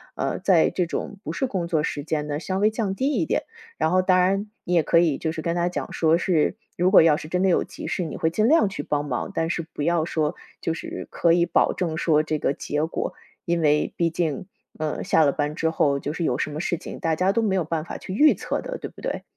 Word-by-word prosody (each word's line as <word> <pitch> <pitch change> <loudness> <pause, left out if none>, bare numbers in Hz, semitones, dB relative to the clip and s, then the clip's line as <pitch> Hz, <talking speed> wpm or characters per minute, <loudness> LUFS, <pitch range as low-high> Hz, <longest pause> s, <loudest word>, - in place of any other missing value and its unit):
呃， - - -2
在 175 -5 +4
这 175 -1 -1
种 200 +3 -5
不 - - -4
是 270 - -1
工 185 -9 -2
作 160 -3 +1
时 145 - -3
间 150 -1 -2
的 145 0 -2
稍 185 +3 -3
微 210 +2 +3
降 210 -3 -2
低 260 +6 0
一 295 - 0
点。 - - 0 0.3
然 160 - +1
后 185 0 +4
当 185 0 +3
然 195 +3 +1
你 180 - -2
也 170 - +5
可 165 - +2
以 165 -5 +3
就 160 - -1
是 160 -1 -6
跟 170 +1 -1
他 175 0 +1
讲 180 - -5
说 160 0 +3
是， 170 -3 +1 0.2
如 180 +1 +3
果 195 - +9
要 155 -2 +4
是 155 - -8
真 180 +3 -1
的 190 - +4
有 175 - +3
急 - - -9
事， 180 - -1
你 160 - -5
会 160 - +1
尽 215 +6 +2
量 315 -4 +5
去 195 - -5
帮 145 0 -1
忙， 125 -4 -3
但 165 0 -1
是 170 - -1
不 - - -5
要 170 0 +2
说 155 -1 -1 0.3
就 165 - -1
是 160 - -7
可 170 - +2
以 170 0 +3
保 165 - +2
证 165 -4 -2
说 155 -2 +3
这 155 0 -1
个 140 - +1
结 150 +2 -2
果， 165 - -3 0.3
因 170 0 0
为 150 -1 +2
毕 170 -1 +2
竟， 160 -2 -2 0.3
嗯， 155 -1 -2
下 160 - +3
了 140 - +4
班 145 +1 -2
之 160 0 0
后 140 -3 +1
就 145 - -4
是 170 - -3
有 125 -6 +1
什 - - -1
么 150 - -5
事 175 +1 -1
情， - - -8
大 160 -1 0
家 185 +4 +2
都 230 - +1
没 200 -3 +1
有 185 - +1
办 160 0 -2
法 - - -6
去 185 - -7
预 300 +9 +6
测 - - -3
的， - - -5
对 - - -6
不 - - -15
对？ - - -3
170 Hz, 295 characters per minute, -24 LUFS, 155-185 Hz, 0.3 s, 果